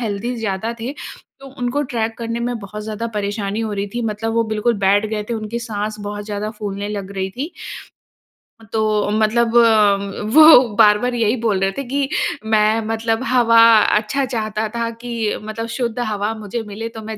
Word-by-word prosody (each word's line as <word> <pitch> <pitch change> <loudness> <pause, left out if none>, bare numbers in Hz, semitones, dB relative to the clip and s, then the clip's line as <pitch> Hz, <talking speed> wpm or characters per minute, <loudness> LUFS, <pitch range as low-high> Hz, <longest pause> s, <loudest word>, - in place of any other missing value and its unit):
Healthy 230 +2 -3
ज़्यादा 220 0 -2
थे 245 +4 -3 0.5
तो 275 - -11
उनको 250 +4 0
ट्रेक 225 -1 -2
करने 230 0 -3
में 245 -1 -3
बहुत 210 +1 -8
ज़्यादा 220 +1 -4
परेशानी 205 +1 -2
हो 220 -2 -3
रही 200 0 -2
थी। 240 - -2
मतलब 220 +2 -3
वो 230 0 +2
बिल्कुल 220 +2 0
बैठ 200 +2 +3
गए 215 -1 -3
थे, - - 0
उनकी 220 +1 -4
साँस 215 -1 -3
बहुत 205 0 -5
ज़्यादा 210 0 -4
फूलने 205 -1 -4
लग 200 -2 -5
रही 190 0 -2
थी। 295 +7 -4 1.2
तो 215 -2 +1
मतलब 225 +2 +1
उम, 210 -3 +3
वो 310 -8 +8
बार-बार 215 +3 +4
यही 230 0 +2
बोल 215 -5 +1
रहे 195 0 +2
थे 275 - -5
कि 275 0 -1 0.4
"मैं 220 0 +3
मतलब 225 +1 -1
हवा 230 -2 +5 0.4
अच्छा 215 +6 -1
चाहता 220 -3 -2
था 230 0 -1
कि 245 - -6 0.3
मतलब 215 +2 -5
शुद्ध 240 -2 -2
हवा 215 -2 -1
मुझे 215 +2 -5
मिले 225 +3 -5
तो 220 - -6
मैं 220 - -5
220 Hz, 180 wpm, -19 LUFS, 210-235 Hz, 1.2 s, वो